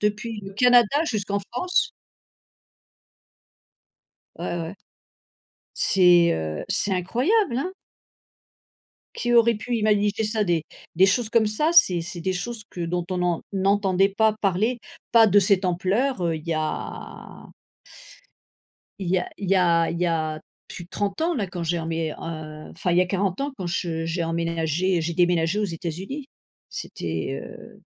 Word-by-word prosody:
depuis 210 +1 -2
le 195 0 -8
Canada 245 +5 +4
jusqu'en 200 - -2
France? 360 +9 0 2.5
Ouais, - - -6
ouais. 165 +4 -5 1.0
C'est, 175 -2 +5
heu, 80 -1 -4
c'est 205 - +3
incroyable, 245 - +1
hein? 365 +6 -3 1.4
Qui 240 0 -1
aurait 235 -1 +5
pu 240 +3 -3
imaginer 210 0 +1
ça 215 0 +1
des 170 -4 0 0.3
des 185 +3 +6
choses 215 +3 +1
comme 230 -1 +3
ça, 300 +10 +2
c'est 185 - +6
c'est 175 0 -6
des 185 +2 -1
choses 215 +5 -5
que 175 - -7
dont 175 +1 -2
on 185 - -2
n'en 175 -2 0
n'entendait 195 0 +2
pas 220 +2 +2
parler, 215 +6 +1 0.3
pas 225 -1 +7
de 205 +1 +5
cette 195 -1 +2
ampleur, 190 +7 0
heu, 165 -1 0
il 155 +1 -9
y 165 - 0
a 155 0 -5 1.5
il 180 -3 -3
y 185 - +3
a 180 - -5
il 200 - -4
y 195 - +4
a 170 -2 +3
il 170 - -4
y 180 - +2
a 155 -2 -1 0.3
plus 175 - -8
de - - -26
30 205 +8 -3
ans 345 +2 +1
là 210 -7 -2
quand 180 -1 -5
j'ai 170 +1 -1
enmé 165 -1 -2
heu, - - -8 0.6
enfin, 175 +1 -2
il 175 - +2
y - - +6
a - - +2
40 190 +1 -1
ans 280 0 -3
quand 185 - -4
je 165 -1 -2
j'ai 165 +1 -2
emménagé 165 +1 0
j'ai 165 +1 -2
déménagé 175 +2 +2
aux 210 - +1
États-Unis, 185 - -6 0.4
c'était, 80 -5 -4
heu - - -13
190 Hz, 160 wpm, -24 LUFS, 170-215 Hz, 2.5 s, pas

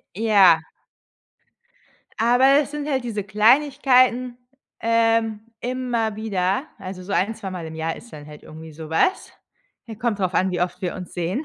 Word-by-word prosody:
Ja. 195 -6 +5 1.6
Aber 250 +5 +4
das 290 - -4
sind 295 0 -5
halt 265 -3 -1
diese 215 -4 -4
Kleinigkeiten, 255 +2 +3 0.4
ähm, 225 -1 +1 0.2
immer 240 -4 -2
wieder. 210 +3 -1
Also, 185 -1 -8
so 195 - -7
ein 205 +3 +1
zweimal 185 -6 -7
im 160 - -8
Jahr 160 +1 -3
ist 235 - -14
dann 145 -1 -10
halt 150 0 -12
irgendwie 160 0 -11
so 155 0 -10
was. 365 - 0 0.5
Ja, 225 - -8
kommt 225 -1 -2
drauf 185 -2 -1
an, 190 +1 +2
wie 180 -1 -3
oft 180 - -2
wir 180 - -2
uns 180 -1 -9
sehen. 180 - -2
215 Hz, 165 wpm, -22 LUFS, 180-245 Hz, 1.6 s, Ja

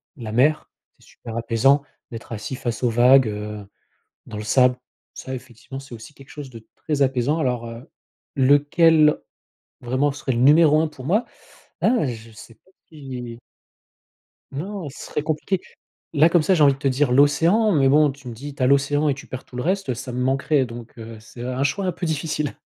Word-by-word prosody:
la 115 -7 -7
mer, 140 +7 +1 0.3
c'est - - -22
super 115 - -10
apaisant 120 +5 +2 0.3
d'être 115 0 -9
assis 115 +4 -5
face 120 -2 -4
aux 120 - +3
vagues, 125 +2 +5
heu, 105 -1 -6 0.6
dans 105 - -8
le 105 - -5
sable. 125 +3 +3 0.4
Ça 130 - -6
effectivement, 130 +1 -10
c'est 135 -2 -13
aussi 115 +6 -13
quelque 135 -1 -17
chose 145 -2 -9
de 115 -3 -13
très 150 -2 -3
apaisant 135 +3 +1
alors, 125 -5 -1
heu, 115 +6 -10 0.5
lequel 150 +3 +4 0.7
vraiment 130 +4 0
serait 140 -1 -3
le 115 - -1
numéro 150 +4 +5
1 160 - 0
pour 130 -4 -12
moi? 205 - +1 0.6
Là 235 - +2
je 115 -2 -7
sais 115 +1 -14
pas 185 - -31 0.2
si 130 -6 -8 1.1
non, 175 +3 -5
ce 135 - -10
serait - - -3
compliqué. 155 +5 -2 0.5
Là 155 +1 +5
comme 170 -1 +3
ça, 190 - +2
j'ai 160 - +3
envie 140 -2 +5
de - - -15
te 140 - 0
dire 135 0 +1
l'océan 165 - +3
mais 140 -5 +3
bon, 150 +2 +4
tu 135 -1 -11
me 120 - -7
dis: 140 +5 -8
«Tu 135 - -5
as - - +4
l'océan 145 +2 +2
et 140 - +1
tu 140 - -12
perds 130 - -8
tout 125 - -13
le 125 - -2
reste», 190 -1 -1
heu, - - -1
ça 125 +1 -7
me 125 - -3
manquerait 135 +2 +1
donc 115 0 -10
heu, 115 0 -9
c'est 115 +2 -12
un 130 +1 -3
choix 185 +8 -1
un 180 - 0
peu 175 - -6
difficile. 155 -2 -2
135 Hz, 205 wpm, -22 LUFS, 120-150 Hz, 1.1 s, vagues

